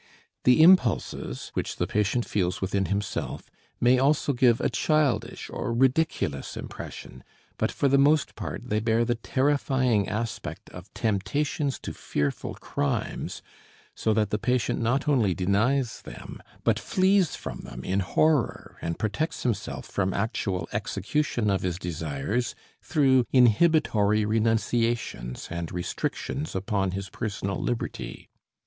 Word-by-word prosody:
The 125 +5 +6
impulses, 145 - +3
which - - -2
the - - 0
patient 105 +3 0
feels 90 -3 -1
within 95 +1 0
himself, 100 +1 -3 0.3
may 125 +1 +4
also 140 +1 +2
give 120 -2 +4
a - - +1
childish 155 -4 0
or - - -3
ridiculous 130 - +1
impression, 65 - -8 0.4
but - - +1
for 140 - +1
the 140 0 +4
most 150 +1 +3
part - - -6
they 105 - +2
bear 115 +1 +2
the 120 - +1
terrifying 130 -3 +1
aspect 110 +1 -4
of 90 +2 -11
temptations 140 +7 0
to - - -5
fearful 70 -1 -2
crimes, 70 - -3 0.5
so 110 - 0
that 105 -2 +1
the 105 - 0
patient 125 +1 0
not 125 +5 +1
only 115 -11 +3
denies 110 +7 +1
them, - - -10 0.2
but - - +2
flees 190 -3 +2
from - - -6
them 65 - -8
in 95 +1 0
horror 145 +8 +1
and 85 0 -3
protects 155 +10 -2
himself 120 -6 -2
from 95 -1 -1
actual 100 -3 -1
execution 105 +3 -1
of 95 - 0
his 90 -2 -2
desires 85 - -2 0.3
through 135 -5 +3
inhibitory 115 -5 +4
renunciations 115 - 0
and 85 -1 -4
restrictions 115 - -3
upon 95 0 0
his 95 +1 -4
personal 100 -3 -3
liberty. 120 - -4
115 Hz, 130 wpm, -26 LUFS, 100-135 Hz, 0.5 s, The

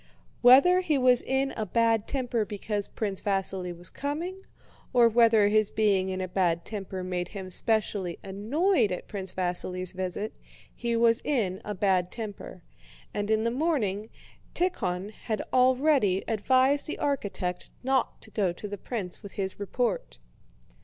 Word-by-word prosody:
Whether 275 +9 +7
he 315 -5 +1
was 250 -2 +5
in 270 +1 0
a 220 - -3
bad 225 +2 +1
temper 245 -4 -1
because 205 0 -3
Prince 200 -4 -3
Vasíli 190 -2 0
was 175 - -6
coming, 335 +7 -4 0.5
or 240 -2 +6
whether 225 -2 +5
his 215 0 +3
being 200 -3 +2
in 185 0 -3
a 185 - -2
bad 175 -2 0
temper 195 -3 -5
made 180 -1 -2
him 190 -2 -8
specially 200 -4 0
annoyed 225 - +1
at 180 - -5
Prince 190 -2 -5
Vasíli's 180 0 -1
visit, 185 +3 -3 0.4
he 235 -1 -1
was 230 +1 +4
in 215 -9 0
a 210 - -4
bad 185 -2 +1
temper, 205 -5 -7 0.5
and 205 0 -2
in 220 0 +2
the 230 - +1
morning 235 - -1 0.5
Tíkhon 205 - -1
had 220 0 -4
already 255 -6 +3
advised 260 +6 +2
the 305 - -4
architect 200 -10 -2
not 265 +1 0
to - - -13
go 195 -5 +1
to 175 +4 -7
the 205 -1 -6
prince 200 -7 -5
with 200 -2 -10
his 190 -1 -4
report. 200 - -2
210 Hz, 155 wpm, -28 LUFS, 190-250 Hz, 0.5 s, Whether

